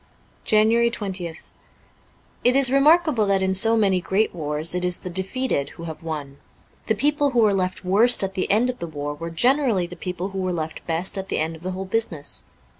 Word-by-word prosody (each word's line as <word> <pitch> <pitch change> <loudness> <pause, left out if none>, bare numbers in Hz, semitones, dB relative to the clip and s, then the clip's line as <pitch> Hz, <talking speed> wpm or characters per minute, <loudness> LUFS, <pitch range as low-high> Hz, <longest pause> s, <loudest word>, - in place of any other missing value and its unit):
* - - -35
JANUARY 225 +2 +4
20th 185 -7 -6 0.9
IT 250 +1 +3
is 270 -2 +6
remarkable 295 -4 +3
that 195 -1 +1
in 190 0 0
so 225 +4 +4
many 195 -4 +2
great 195 +4 0
wars 155 0 -1
it 180 0 -2
is 180 -1 0
the 180 - -8
defeated 190 - 0
who 165 - -9
have 160 -2 -8
won. 150 -4 -6 0.5
The 220 - +1
people 290 +5 +1
who 245 -3 0
were 210 -2 +3
left 185 -1 -2
worst 215 +5 +5
at 195 0 -3
the 185 -1 -2
end 235 +5 +2
of 245 - -17
the 170 - -5
war 145 -2 -5
were 165 +3 -7
generally 240 - +1
the 175 +1 -10
people 180 +1 -5
who 195 -1 -6
were 185 -1 -2
left 160 -2 -6
best 170 +4 -1
at 190 - -7
the - - -1
end 160 +1 -2
of 160 - -15
the 185 +1 -4
whole 190 +1 -5
business. 185 -7 -1
190 Hz, 215 wpm, -22 LUFS, 170-225 Hz, 0.9 s, is